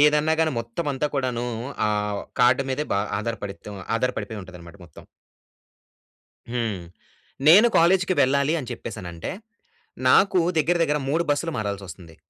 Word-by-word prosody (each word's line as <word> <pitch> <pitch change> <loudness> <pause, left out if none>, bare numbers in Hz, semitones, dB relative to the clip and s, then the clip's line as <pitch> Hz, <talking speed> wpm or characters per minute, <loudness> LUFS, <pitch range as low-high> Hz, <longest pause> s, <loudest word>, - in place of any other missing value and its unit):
ఏదన్నా 150 +1 +4
గాని 160 - +2
మొత్తం 115 +8 -5
అంతా 135 +2 -1
కూడాను, 125 -3 -1 0.4
ఆ - - +1 0.3
వొ - - -6 0.2
కార్డ్ 125 +2 +5
మీదే 145 +3 -1
బా - - +2 0.2
ఆధారపడి‌త్తం 105 -2 -6 0.2
ఆధారపడిపోయింటదనమాట 100 -8 -5
మొత్తం. 80 - -15 1.4
హ్మ్. 115 -6 -2 0.7
నేను 200 +9 +8
కాలేజ్‌‌‌కి 185 +2 +4
వెళ్ళాలి 140 +4 +2
అని 130 - -7
చెప్పేసనంటే, 90 -7 -6 0.8
నాకు 190 +5 +5 0.2
దగ్గర 160 +3 +2
దగ్గర 150 -2 +1
3 160 +4 +1
బస్సులు 145 +3 0
మారాల్సొస్తుంది. 95 -5 -6
125 Hz, 120 wpm, -24 LUFS, 100-150 Hz, 1.4 s, నేను